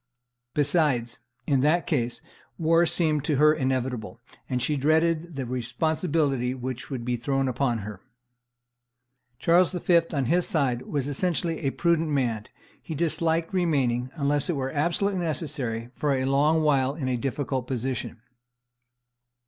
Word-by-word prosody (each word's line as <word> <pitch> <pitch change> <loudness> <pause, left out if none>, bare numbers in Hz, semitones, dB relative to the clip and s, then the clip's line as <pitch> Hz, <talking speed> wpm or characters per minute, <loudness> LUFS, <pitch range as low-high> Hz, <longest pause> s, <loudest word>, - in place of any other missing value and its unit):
Besides, 135 -6 +1 0.3
in 140 -3 +2
that 155 +6 +2
case, 120 -7 -1 0.3
war 165 +1 +3
seemed 160 -4 +1
to 150 - +1
her 150 +2 +5
inevitable; 130 -5 -2 0.3
and 125 - 0
she 140 +5 0
dreaded 160 +3 +1
the 135 -2 -3
responsibility 135 - 0
which 130 -1 -5
would 130 -4 -4
be 125 0 0
thrown 135 +3 0
upon 120 -4 -1
her. 105 -2 -8 1.4
Charles 170 +6 +3
V., 175 -1 +4
on 140 -4 0
his 175 +7 +2
side, 130 -6 0
was 145 -3 -2
essentially 165 +2 0
a 140 - 0
prudent 165 +2 +1
man; 120 -7 0 0.4
he 160 - -6
disliked 165 +1 0
remaining, 135 -9 +1
unless 145 -1 0
it 175 - +1
were 135 -1 -2
absolutely 175 +6 0
necessary, 140 -8 -3
for 145 -2 0
a 130 0 -1
long 150 +4 +3
while 140 -2 +2
in 140 -5 -3
a 130 - +1
difficult 135 0 -2
position. 125 -2 -3
140 Hz, 140 wpm, -26 LUFS, 125-160 Hz, 1.4 s, her